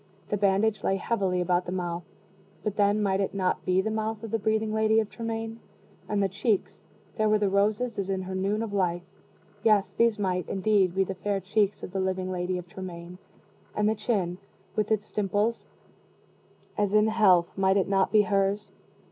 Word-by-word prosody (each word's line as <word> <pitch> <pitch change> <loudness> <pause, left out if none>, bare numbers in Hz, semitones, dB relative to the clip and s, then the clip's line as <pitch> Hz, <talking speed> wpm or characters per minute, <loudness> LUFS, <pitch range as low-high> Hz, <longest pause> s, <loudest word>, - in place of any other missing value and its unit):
The - - +1
bandage 200 +1 +2
lay 195 - +2
heavily 190 -3 0
about 180 0 +1
the - - -3
mouth 175 -2 -3 0.6
but 210 -2 -2
then 205 +1 +2
might 195 -1 +1
it 195 - -2
not 185 -2 0
be 185 +1 +3
the 220 - -2
mouth 220 0 -3
of 225 - -6
the 225 - 0
breathing 220 +1 0
Lady 220 0 +3
of 215 -2 -2
Tremaine? 225 -1 -4 0.5
And 205 -1 +1
the - - +3
cheeks 205 +1 -1 0.4
there 215 -1 +2
were 215 - +4
the 205 -2 0
roses 210 +3 +1
as 195 -1 -2
in 190 -1 -1
her 190 +1 -6
noon 200 +4 0
of 215 -3 -5
life 175 -3 0 0.6
yes, 210 -2 +3
these 230 -2 +2
might 185 -3 -1
indeed 195 -2 +2
be 195 - +3
the 195 - -4
fair 200 +1 -2
cheeks 200 +2 0
of - - -6
the 195 - -2
living 185 0 -1
Lady 180 0 -2
of 180 0 -7
Tremaine. 175 -1 -8 0.6
And 210 0 +2
the 215 - +3
chin, 200 -5 -1 0.4
with 210 -1 0
its 215 -1 -1
dimples, 210 +3 0 1.1
as 205 0 +1
in 210 0 +5
health, 190 -6 +4
might 190 0 +3
it 195 - +1
not 195 -1 +2
be 210 -1 +5
hers? 200 +1 0
200 Hz, 195 wpm, -27 LUFS, 185-215 Hz, 1.1 s, in